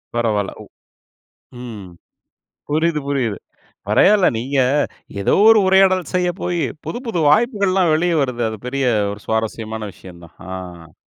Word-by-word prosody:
பரவால்ல 110 -4 0
ஒ - - -11 1.0
ம், 110 -6 -8 0.8
புரியுது, 155 +1 +1
புரியுது. 130 -7 -1 0.5
பரவால்ல 205 -1 +4
நீங்க, 135 +4 -2 0.6
ஏதோ 100 - +2
ஒரு 225 -1 +7
உரையாடல் 190 -2 +3
செய்ய 180 -1 +1
போயி, 175 -2 -1 0.2
புது - - -4
புது 200 -7 -1
வாய்ப்புகள்லாம் 195 - +2
வெளியே 170 +2 +1
வருது. 125 -3 -2
அது 110 -1 -6
பெரிய 135 +2 -2 0.3
ஒரு 100 - -9
சுவாரஸ்யமான 110 0 -3
விஷயம் 90 -2 -14
தான். 80 - -17 0.2
அ. 90 -4 -9
140 Hz, 130 wpm, -19 LUFS, 110-180 Hz, 1.0 s, ஒரு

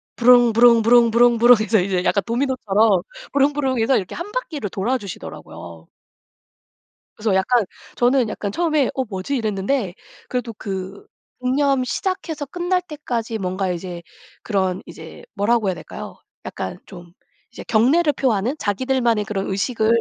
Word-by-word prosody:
부릉부릉부릉부릉부릉 240 0 +6
해서 220 0 +2
이제 185 -1 0
약간 200 +1 +1
도미노처럼 225 -6 +1 0.3
부릉부릉 275 -2 +1
해서 250 +4 +3
이렇게 185 - -4
1 370 +5 -6
바퀴를 310 - -4
돌아 225 +8 -1
주시더라고요. 85 - -10 1.3
그래서 210 -2 0
약간 215 +4 +2 0.3
저는 245 -1 +2
약간 205 -1 -4
처음에 310 - +1
'어 265 - 0
뭐지?' 205 +5 -4
이랬는데 215 -2 -1 0.4
그래도 250 -2 -3
그 195 -1 -6 0.3
묵념 265 +1 +1
시작해서 320 +1 -3
끝날 355 +5 -1
때까지 245 -9 -4
뭔가 185 -1 -2
이제 175 0 -6 0.4
그런 190 -4 -1
이제 160 -1 -11
뭐라고 215 +1 +1
해야 185 - 0
될까요. - - -9 0.3
약간 - - -6
좀 175 -3 -13 0.4
이제 - - -9
경례를 290 +8 +3
표하는 245 -1 0
자기들만의 235 -1 0
그런 195 -1 -3
의식을 220 +3 -1
230 Hz, 335 characters per minute, -21 LUFS, 195-260 Hz, 1.3 s, 부릉부릉부릉부릉부릉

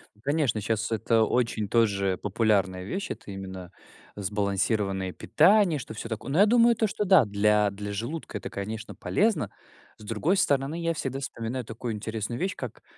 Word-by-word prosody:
Ну 105 - -25
конечно, 140 -4 0
щас 115 +2 -1
это 115 0 +2
очень 115 -2 0
тоже 100 -4 +2
популярная 100 -3 +1
вещь. 190 - -4
Это 100 - -7
именно 95 -2 -7 0.4
сбалансированное 100 -1 -1
питание, 165 - +3
что 120 - -8
всё 105 - -6
такое. 110 +3 -5
Но 155 - 0
я 200 - +8
думаю 235 +1 +5
то, 225 - +1
что 205 - -2
да, 185 - +6
для 105 0 +2
для 100 +1 -6
желудка 115 +3 -4
это, - - -6
конечно, 110 +3 -5
полезно. 220 +1 0 0.5
С - - -14
другой 115 - 0
стороны, 140 -1 +1
я 165 0 0
всегда 135 -3 -3
вспоминаю 125 -1 -4
такую 115 +1 -5
интересную 110 +2 -4
вещь, 190 +1 -1
как, - - -7
110 Hz, 170 wpm, -27 LUFS, 100-145 Hz, 0.5 s, я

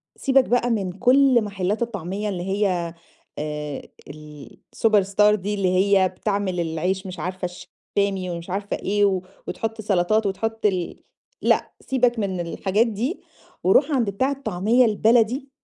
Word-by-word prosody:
سِيبك 270 -1 +3
بقى 245 0 +1
من 200 -6 -1
كل 250 +4 +4
محلات 200 0 -2
الطعمية 205 -2 -3
اللي 180 -3 -4
هي 185 -3 -1 0.5
آآ، 150 -1 -4 0.3
الsuperstar 195 +8 0
دي 205 +1 -3
اللي 195 -3 +1
هي 195 -1 +4
بتعمل 195 -1 -2
العيش 175 +4 -2
مش 185 -2 -8
عارفة 185 +3 -4 0.5
الشامي 195 -2 0
ومش 170 +1 -6
عارفة 200 +2 -3
إيه، 205 +1 +1
و 190 -2 +1 0.3
وتحط 225 0 -4
سَلطات 205 +1 +1
وتحط 220 +3 -2
ال 185 -4 -1 0.4
لأ، - - +2
سِيبك 245 -3 +1
من 190 -3 -2
الحاجات 190 +6 0
دي 230 - -3 0.4
وروح 265 - +4
عند 245 -7 +1
بتاع 260 +8 0
الطعمية 245 -2 +2
البلدي 230 +5 +2
200 Hz, 140 wpm, -23 LUFS, 185-225 Hz, 0.5 s, كل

